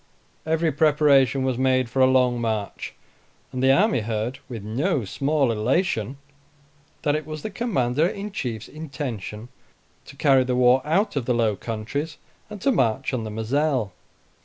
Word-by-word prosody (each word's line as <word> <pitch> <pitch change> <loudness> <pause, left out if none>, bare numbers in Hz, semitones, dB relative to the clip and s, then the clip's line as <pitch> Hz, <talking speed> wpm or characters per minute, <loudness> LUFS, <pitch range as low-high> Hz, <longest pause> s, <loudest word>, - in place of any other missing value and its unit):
Every 160 0 +1
preparation 140 -3 +3
was 130 -2 -1
made 130 -1 +2
for 125 +4 -3
a 130 - +7
long 125 -2 +2
march; 110 -3 -3 0.6
and 130 -1 -4
the 130 0 +5
army 200 - +3
heard, 110 +3 -3
with 115 -5 -6
no 130 - -1
small 140 +4 +1
elation, 120 - 0 0.9
that 145 0 +2
it 155 - -2
was 155 -1 -6
the 215 - -4
Commander 160 - +1
in 200 +2 -5
Chief's 115 - -4
intention 125 - -6 0.6
to 140 - -13
carry 135 -2 +4
the 125 0 -1
war 125 +1 +5
out 180 +7 +1
of 135 -4 -1
the 125 - +1
Low 110 -3 +2
Countries, 120 +9 -4 0.3
and 210 -1 -8
to 275 - +3
march 130 - +1
on 115 -3 -2
the - - -4
Mozelle. 120 +1 0
130 Hz, 160 wpm, -24 LUFS, 115-150 Hz, 0.9 s, a